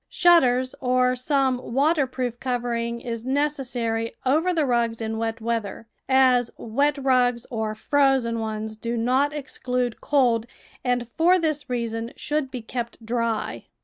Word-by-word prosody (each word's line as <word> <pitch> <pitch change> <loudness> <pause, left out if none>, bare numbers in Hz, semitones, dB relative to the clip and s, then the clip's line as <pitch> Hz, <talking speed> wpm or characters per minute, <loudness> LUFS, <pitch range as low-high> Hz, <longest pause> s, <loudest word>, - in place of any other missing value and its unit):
Shut 350 -1 +6
ters 255 0 +1
or 255 0 +2
some 260 0 +1 0.2
waterproof 265 -5 +1
covering 235 -2 -2
is 230 -2 -5
necessary 250 -5 -1
over 315 +8 +3
the 325 -4 +1
rugs 235 -3 0
in 220 0 -3
wet 225 0 -2
weather, 225 -2 -3 0.2
as 255 -2 +4
wet 280 +6 0
rugs 250 -3 +2
or 220 -2 -2
frozen 265 -1 +2
ones 220 0 -4
do 235 +2 -3
not 255 +5 +2
exclude 250 -4 -3
cold, 245 -5 +2 0.4
and 245 -1 0
for 345 +8 +4
this 310 -5 -2
reason 230 -1 -3
should 300 -2 -2
be 250 -3 -6
kept 235 -1 -6
dry. 230 -1 -2
245 Hz, 140 wpm, -24 LUFS, 230-270 Hz, 0.4 s, Shut